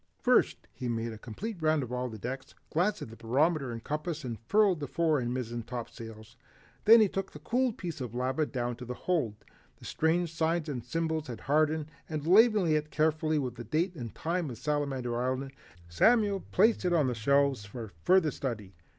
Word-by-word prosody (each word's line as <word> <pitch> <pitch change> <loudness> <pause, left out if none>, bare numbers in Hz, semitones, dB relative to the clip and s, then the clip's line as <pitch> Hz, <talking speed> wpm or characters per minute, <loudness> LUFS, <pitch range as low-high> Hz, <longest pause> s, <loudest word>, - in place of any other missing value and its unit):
First, - - +2
he 125 - -4
made 115 0 -2
a 110 - -10
complete 180 - -6
round 155 -2 +2
of 125 - -7
all 125 0 -2
decks, 125 +4 -6 0.2
glanced 185 +6 +1
at 110 - -9
the - - -10
barometer 135 +5 +1
and 115 -1 -6
compass, 155 +1 -3
and 120 -3 -5
furled 205 -5 +4
the 145 - -4
fore 160 0 +1
and 120 -1 -2
mizzen 120 -2 -3
topsails. 115 -2 -8 0.5
Then 225 +1 +9
he 215 - +5
took 195 0 -4
the - - -8
cooled 245 - 0
piece 170 -6 -5
of 120 -2 -5
lava 130 +5 0
down 120 -2 -3
to 125 - -8
the 125 +1 -5
hold. 150 -13 -1 0.4
The - - -14
strange 165 +1 0
signs 165 0 0
and 130 -6 -4
symbols 160 +2 -2
had 120 -3 -7
hardened, 155 +2 +2 0.2
and 155 -2 -3
labeling 205 -1 +5
it 150 0 +1
carefully 155 0 +1
with 130 -5 -2
the 120 - -6
date 160 - 0
and 120 -9 -6
name 170 -1 0
of 120 - -7
Salamander 135 -4 -1
Island, 130 +2 -2 0.4
Samuel 205 - +3
placed 220 +3 +4
it 180 -1 +1
on 155 -5 +3
his 125 -2 -2
shelves 140 -1 +2
for 110 0 -8
further 180 -4 +4
study. 110 -9 -5
145 Hz, 195 wpm, -30 LUFS, 120-165 Hz, 0.5 s, Then